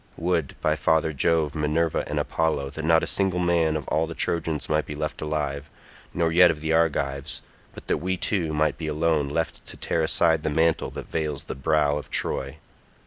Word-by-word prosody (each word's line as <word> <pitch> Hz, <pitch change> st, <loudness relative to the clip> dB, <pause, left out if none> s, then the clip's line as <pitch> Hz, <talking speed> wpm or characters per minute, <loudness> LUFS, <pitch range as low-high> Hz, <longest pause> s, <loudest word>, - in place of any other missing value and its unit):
Would, 85 Hz, -4 st, -1 dB
by 75 Hz, 0 st, +2 dB
father 80 Hz, +1 st, +1 dB
Jove, 80 Hz, +1 st, +1 dB
Minerva, 75 Hz, +1 st, 0 dB
and -, -, -3 dB
Apollo, 75 Hz, -4 st, -1 dB
that 80 Hz, -, -6 dB
not 80 Hz, 0 st, +4 dB
a -, -, +1 dB
single 95 Hz, -2 st, 0 dB
man 85 Hz, -3 st, +2 dB
of 75 Hz, -, -7 dB
all 80 Hz, +1 st, +1 dB
the 80 Hz, -, -7 dB
Trojans 80 Hz, -3 st, -1 dB
might 75 Hz, 0 st, 0 dB
be -, -, -5 dB
left -, -, -4 dB
alive, 75 Hz, -2 st, -3 dB, 0.4 s
nor 85 Hz, -1 st, 0 dB
yet 90 Hz, +2 st, +7 dB
of 80 Hz, -2 st, -1 dB
the 80 Hz, +1 st, -1 dB
Argives, 70 Hz, -4 st, 0 dB, 0.3 s
but -, -, -11 dB
that -, -, 0 dB
we 95 Hz, +1 st, -2 dB
two 85 Hz, -4 st, 0 dB
might 75 Hz, -3 st, 0 dB
be 80 Hz, -, -4 dB
alone 75 Hz, -1 st, +1 dB
left 80 Hz, +3 st, -3 dB
to -, -, -8 dB
tear 85 Hz, -, -1 dB
aside 80 Hz, 0 st, +3 dB
the 80 Hz, -, -1 dB
mantle 80 Hz, +2 st, +1 dB
that -, -, -8 dB
veils 75 Hz, -4 st, -2 dB
the -, -, -5 dB
brow 70 Hz, +2 st, +1 dB
of 70 Hz, -, -11 dB
Troy." 70 Hz, +3 st, -1 dB
80 Hz, 200 wpm, -25 LUFS, 75-80 Hz, 0.4 s, yet